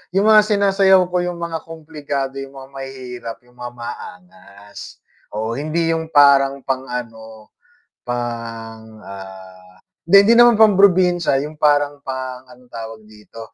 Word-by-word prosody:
Yung 195 +2 +2
mga 215 -1 +7
sinasayaw 195 -2 +4
ko 180 - 0
yung 175 -1 -5
mga 165 -1 -4
kumplikado, 150 -4 -5
yung 135 0 -8
mga 135 0 -11
mahihirap, 130 -4 -8
yung 125 0 -25
mga 120 0 -7
maangas. 105 - -11 0.6
O 110 +2 -3
hindi 155 +3 -2
yung 165 0 -2
parang 140 -1 +5
pang 130 0 -2
ano, 115 -2 -11 0.8
pang, 115 -2 -5 0.3
ah, 95 -1 -13 0.3
hindi 185 +4 +6
hindi 230 - +6
naman 240 -1 +7
pang 215 -3 +6
probinsya, 180 -7 +3
yung 150 +1 -9
parang 145 0 +2
pang, 130 -1 -5
anong 125 0 -19
tawag 110 -1 -8
dito, 105 +2 -15
135 Hz, 140 wpm, -19 LUFS, 115-170 Hz, 0.8 s, mga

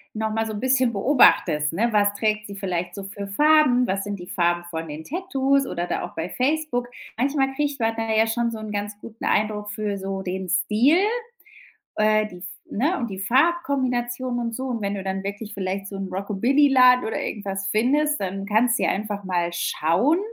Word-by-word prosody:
nochmal 220 0 -1
so 220 - -4
'n 205 - -4
bisschen 260 -1 +2
beobachtest, 195 - +4
ne? 230 +7 +1
Was 205 -1 +3
trägt 215 0 0
sie 200 - -8
vielleicht 180 -3 -3
so 200 - -6
für 200 +1 -7
Farben? 255 +2 +4
Was 195 -1 -1
sind 205 -2 -5
die 175 - -8
Farben 175 -2 0
von 165 0 -4
den 150 +1 -7
Tattoos 275 - 0
oder 175 0 -3
da - - -2
auch - - -8
bei 165 +2 -3
Facebook? 260 -1 -1 0.3
Manchmal 270 +2 0
kriegt 285 0 -2
man 225 -1 0
da 225 0 -2
ja 220 0 +4
schon 235 +1 0
so 225 - -5
'n 215 -1 -7
ganz 205 0 -4
guten 225 +1 -9
Eindruck 210 -1 0
für 210 -1 -3
so 195 0 -4
den 185 0 -4
Stil 210 - +3 1.0
äh, 215 0 +3
die 180 -2 -11 0.3
ne? 290 - 0
und 235 -4 -3
die 190 - -6
Farbkombination 255 - 0
und 230 -1 -3
so, 255 -2 -3
wenn 200 0 -2
du 195 - -4
dann 190 0 -3
wirklich 205 +2 -6
vielleicht 195 0 -3
so 195 - -7
'n 195 -1 -4
Rockabilly 210 +10 +2
Laden 255 -2 +6
oder 220 - -2
irgendwas 195 -2 -4
findest, 285 +8 +1
dann 195 +1 -3
kannst 225 +3 +2
du - - 0
dir - - +2
einfach 205 0 -3
mal 175 -2 0
schauen, 175 - +1
215 Hz, 200 wpm, -23 LUFS, 195-250 Hz, 1.0 s, Laden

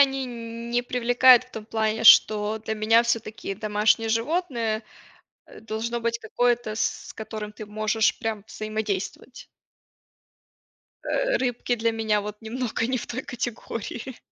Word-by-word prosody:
они 270 -1 +3
не 235 0 -4
привлекают 245 +1 +5
в 255 - -24
том 220 -3 -7
плане, 220 0 -1
что 215 -1 +6
для 220 0 -4
меня 225 +2 +4
всё-таки 220 -3 -2
домашнее 215 +2 +1
животное, 230 -3 -1 0.6
э, - - -14
должно 225 +2 -3
быть 235 0 -1
какое-то, 235 0 0
с 225 - -2
которым 215 -1 -6
ты 215 - -8
можешь 215 +1 0
прям 225 -3 -3
взаимодействовать. 215 -2 -4 1.6
Э, - - +1
рыбки 245 -1 -1
для 230 0 +1
меня 220 -2 +1
вот 210 0 -6
немного 230 0 -2
не 255 0 -1
в - - -6
той 255 +2 -4
категории. 240 0 -5
225 Hz, 135 wpm, -25 LUFS, 215-240 Hz, 1.6 s, что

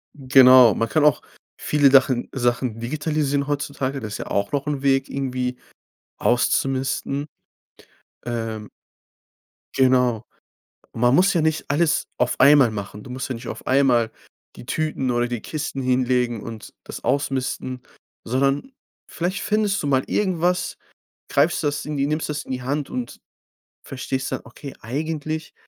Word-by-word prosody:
Genau, 130 -3 +7
man 115 0 -1
kann 150 +6 +2
auch 150 -4 +4 0.4
viele 145 -2 +3
Dachen 130 -2 +3
Sachen 120 -2 -1
digitalisieren 145 +2 -1
heutzutage. 140 -2 -2
Das 110 -4 -6
ist - - -3
ja - - -6
auch 100 0 -1
noch 140 -1 -1
'n 145 -2 -2
Weg 135 -1 +2
irgendwie 125 -2 -3 0.6
auszumisten. 135 +3 0 1.0
Ähm 115 -3 -4 1.1
Genau. 125 -4 +3 0.7
Man 120 +2 +2
muss 185 +5 +4
ja 170 - +2
nicht 160 0 0
alles 150 +2 +1
auf 125 0 0
einmal 140 -3 +6
machen. 105 0 -7
Du - - -12
musst 130 +2 -5
ja 130 - -2
nicht 115 - -9
auf - - -7
einmal 130 -4 +3 0.4
die - - -11
Tüten 150 -2 -1
oder 120 0 +1
die 120 -2 -4
Kisten 150 -3 -4
hinlegen 125 -2 +1
und 115 0 -9
das - - -9
ausmisten, 130 -1 -2 0.4
sondern 135 - 0 0.4
vielleicht 180 +3 -3
findest 210 -2 0
du - - -1
mal 135 -2 +2
irgendwas, 180 -2 0 0.5
greifst - - +2
das 145 0 -1
in 150 -1 -4
die 140 0 +1
nimmst 155 +1 -2
das 150 0 -3
in - - -8
die 130 -1 -3
Hand 140 +3 -2
und 120 -1 -5 0.7
verstehst 135 0 -4
dann: 130 - -3
„Okay, 135 +3 -10
eigentlich 155 +5 -4
135 Hz, 145 wpm, -22 LUFS, 125-145 Hz, 1.1 s, Genau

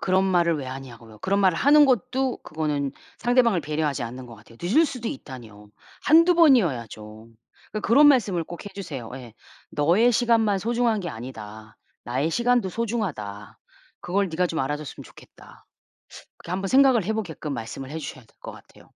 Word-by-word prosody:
그런 190 0 +2
말을 170 -3 +2
왜 140 - -5
하냐고요. 120 -4 -10
그런 200 - 0
말을 185 -4 +3
하는 295 +2 +6
것도 255 0 0
그거는 150 -3 -3 0.3
상대방을 240 -6 +2
배려하지 150 -3 -2
않는 125 +2 -7
것 115 - -11
같아요. 115 +2 -18
늦을 235 - +3
수도 250 -5 -5
있다니요. 115 - -10 0.3
1-2 335 +3 +5
번이어야죠. 115 - +1 0.4
그러니까 215 - -4
그런 280 +6 +6
말씀을 200 - +2
꼭 175 +4 -10
해주세요. 175 - -7
예. 120 -4 -11 0.4
"너의 185 +12 +3
시간만 225 -4 +2
소중한 230 +1 0
게 175 - -5
아니다. 110 -2 -10 0.3
나의 130 +6 -1
시간도 240 0 +1
소중하다. 175 - -4 0.4
그걸 195 +2 -1
네가 180 +3 0
좀 165 - -4
알아줬으면 145 +2 -4
좋겠다." - - -17 0.7
그렇게 170 - -10
한번 195 +1 -2
생각을 260 -4 +5
해 205 - -2
보게끔 165 -8 -5
말씀을 130 +3 -7
해 160 - -5
주셔야 130 -4 -8
될 - - -29
것 - - -8
같아요. - - -17
175 Hz, 380 characters per minute, -24 LUFS, -, 0.7 s, 하는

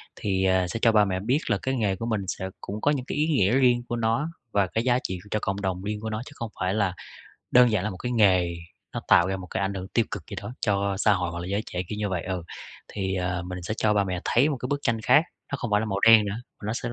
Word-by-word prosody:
Thì, 95 -2 0
ờ, 95 -1 +3
sẽ 115 - -4
cho 115 - +5
ba 105 -1 +5
mẹ 95 -2 -1
biết 120 +9 +1
là 105 - +2
cái 130 0 -1
nghề 105 -6 +1
của 105 - -5
mình 110 -3 -1
sẽ 95 +1 -3
cũng 105 +2 -6
có 145 - +3
những 135 -4 -2
cái - - -4
ý 150 +1 +2
nghĩa 120 - +3
riêng 125 -2 +3
của 120 - -1
nó 115 +6 0 0.2
và 100 -2 +2
cái 115 +5 -1
giá 125 0 +3
trị 95 -1 -3
cho 105 - +1
cộng 100 +1 -2
đồng 95 -2 -2
riêng 105 +1 -3
của 110 - -3
nó, 110 0 -3
chứ - - -11
không 115 -4 -5
phải 95 +1 0
là 100 -4 +1 0.6
đơn 125 -1 +6
giản 105 -4 +1
là 105 - -1
một 95 - -7
cái 125 +6 -4
nghề 95 -7 +3 0.4
nó - - -3
tạo 85 - +6
ra 95 0 -1
một 90 -1 -9
cái - - -3
ảnh 100 0 -1
hưởng 95 -1 -5
tiêu 115 +3 +1
cực - - -5
gì - - -6
đó 100 +4 -7
cho 100 -1 +1
xã 105 +1 +4
hội 90 -3 -1
hoặc 85 - -5
là 85 - -5
giới 100 +2 -1
trẻ, 90 - -3
kiểu 105 - -5
như 105 -1 -1
vậy, 90 -3 -2
ừ. 95 -2 -3 0.4
Thì, 95 -2 -3
ờ, 90 -1 -2
mình 90 0 -5
sẽ 105 - -2
cho 105 -1 +2
ba 100 -1 +3
mẹ 90 -2 -3
thấy 130 +6 +3
một 145 - -2
cái 125 - -4
bức 145 +1 -1
tranh 115 -4 0
khác; 150 +7 +5 0.3
nó - - 0
không 120 -4 -4
phải 105 - +4
là 110 - -1
màu 100 -2 -2
đen 110 0 +7
nữa, 100 0 -3 0.3
mà - - -7
nó 110 - -1
sẽ 120 0 -3
105 Hz, 310 wpm, -26 LUFS, 95-115 Hz, 0.6 s, đen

